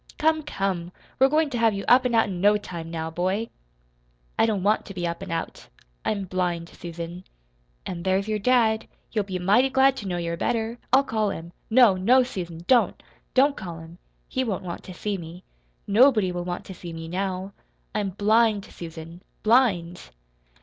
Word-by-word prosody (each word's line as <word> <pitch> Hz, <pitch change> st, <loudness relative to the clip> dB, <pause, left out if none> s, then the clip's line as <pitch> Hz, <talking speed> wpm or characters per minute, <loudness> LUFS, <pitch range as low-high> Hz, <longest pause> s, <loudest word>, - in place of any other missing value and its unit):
Come, 315 Hz, 0 st, +2 dB
come! 195 Hz, -, -3 dB, 0.3 s
We're 265 Hz, +1 st, +6 dB
goin' 305 Hz, 0 st, +2 dB
to 240 Hz, -, -2 dB
have 225 Hz, -2 st, +3 dB
you 195 Hz, -, -4 dB
up 250 Hz, +1 st, +6 dB
an' 240 Hz, -, -1 dB
out 225 Hz, -, +5 dB
in 180 Hz, -3 st, -4 dB
no 205 Hz, +1 st, +5 dB
time, 170 Hz, -5 st, -7 dB
now, 160 Hz, -1 st, -4 dB
boy!" 190 Hz, +7 st, -1 dB, 0.9 s
"I -, -, +3 dB
don't 205 Hz, -4 st, -1 dB
want 210 Hz, +2 st, +2 dB
to 195 Hz, -, -9 dB
be 175 Hz, -1 st, -2 dB
up 170 Hz, +1 st, -3 dB
and 195 Hz, -2 st, -6 dB
out. 165 Hz, 0 st, -4 dB, 0.4 s
I'm 200 Hz, -2 st, -1 dB
blind, 175 Hz, -2 st, -2 dB
Susan." 170 Hz, +1 st, -8 dB, 0.6 s
"An' 175 Hz, -2 st, -5 dB
there's 190 Hz, +2 st, +1 dB
your 215 Hz, -1 st, -1 dB
dad. 225 Hz, -1 st, +2 dB, 0.2 s
He'll 215 Hz, -, +1 dB
be 190 Hz, -2 st, -4 dB
mighty 205 Hz, +9 st, +3 dB
glad 265 Hz, 0 st, +4 dB
to 205 Hz, -, -5 dB
know 180 Hz, -1 st, -2 dB
you're 170 Hz, -1 st, -3 dB
better. 230 Hz, +4 st, -1 dB
I'll 265 Hz, +2 st, +6 dB
call 220 Hz, -5 st, 0 dB
him." 170 Hz, -2 st, -7 dB, 0.2 s
"No, 225 Hz, -5 st, +6 dB
no, 250 Hz, +8 st, +5 dB
Susan 175 Hz, -8 st, -6 dB
don't! 250 Hz, +1 st, +3 dB, 0.3 s
Don't 275 Hz, +2 st, +4 dB
call 175 Hz, -5 st, -7 dB
him. 165 Hz, +2 st, -12 dB, 0.3 s
He 260 Hz, -, -1 dB
won't 210 Hz, -7 st, -3 dB
want 175 Hz, -2 st, -6 dB
to 185 Hz, -, -8 dB
see 205 Hz, 0 st, -3 dB
me. 170 Hz, +2 st, -10 dB, 0.4 s
Nobody 215 Hz, -3 st, +4 dB
will 175 Hz, 0 st, -4 dB
want 175 Hz, 0 st, -4 dB
to 190 Hz, -, -8 dB
see 175 Hz, -1 st, -9 dB
me 165 Hz, 0 st, -7 dB
now. 190 Hz, +2 st, -3 dB, 0.4 s
I'm 210 Hz, -2 st, -1 dB
blind, 210 Hz, +1 st, +2 dB
Susan 165 Hz, -1 st, -10 dB, 0.2 s
blind!" 200 Hz, -8 st, +2 dB
195 Hz, 190 wpm, -25 LUFS, 175-230 Hz, 0.9 s, We're